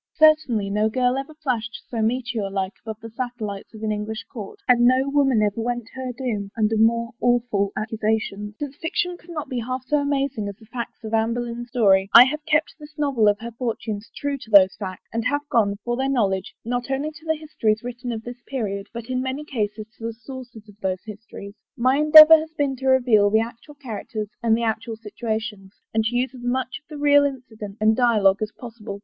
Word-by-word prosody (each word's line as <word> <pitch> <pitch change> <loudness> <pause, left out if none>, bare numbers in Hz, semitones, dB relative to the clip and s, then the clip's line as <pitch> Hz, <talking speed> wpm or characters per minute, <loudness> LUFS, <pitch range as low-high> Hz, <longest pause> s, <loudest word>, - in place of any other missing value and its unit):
Certainly 270 -10 +4
no 210 +2 +2
girl 250 +2 +1
ever 275 +3 -5
flashed 245 -8 -3
so 230 -2 -3
meteor 230 -2 -1
like 195 0 -2
above 220 -1 -7
the 225 - -8
satellites 225 -4 -5
of 215 - -10
an 215 - 0
English 215 +1 -4
court, 210 -6 -7
and 245 -2 +5
no 255 +2 +4
woman 275 -6 +3
ever 210 +2 0
went 240 0 -2
to - - -18
her 260 -1 -4
doom 230 -5 -3
under 220 0 +2
more 230 +2 +2
awful 240 -5 +1
accusations. 215 -1 -2
Since 285 -1 -6
fiction 350 +3 -2
could 350 0 -19
not 315 -3 -5
be 255 - -3
half 255 +2 -4
so 295 - +2
amazing 275 -6 -1
as 200 - -8
the 220 - -18
facts 235 +1 -7
of 220 0 -6
Anne 225 +1 +2
Boleyn's 240 0 -4
story, 195 -5 +3
I 240 - +13
have 300 +4 -2
kept 310 0 +2
this 300 0 -13
novel 275 -7 +2
of 205 0 +4
her 235 +1 -6
fortunes 225 -3 -4
true 285 -1 -2
to 225 - -12
those 190 -3 +7
facts, 185 -3 -7
and 230 0 -1
have 290 +2 0
gone, 205 -4 +3
for 240 0 -1
their 265 +2 -1
knowledge, 195 -8 0
not 245 +2 -2
only 275 +3 -1
to 310 +1 -15
the 320 - +2
histories 230 -8 -1
written 245 0 -5
of 225 -1 -5
this 245 +1 -9
pe 275 - -4
riod, 200 -3 -3
but 235 -1 -7
in 255 +1 -2
many 260 +3 -3
cases 215 -6 -3
to 225 - -6
the 230 - -4
sources 245 -2 -11
of 205 0 -17
those 185 -1 -2
histories. 210 -1 -10 0.2
My 255 +3 +3
endeavor 310 +1 +10
has 315 0 -7
been 280 -2 0
to 265 +1 -4
reveal 245 -6 +4
the 220 +2 +3
actual 235 +6 -8
characters 220 -5 -6
and 225 -1 +3
the 235 - -2
actual 225 0 -2
situations, 220 -2 -5 0.2
and 220 0 +2
to 235 +2 -1
use 255 +1 0
as 255 - -11
much 255 +1 -2
of 295 - -55
the 305 - -7
real 285 0 +5
incident 225 -7 -5
and 215 +1 +4
dialogue 215 -5 +3
as 215 0 -2
possible. 225 -4 -9
235 Hz, 220 wpm, -23 LUFS, 215-260 Hz, 0.2 s, I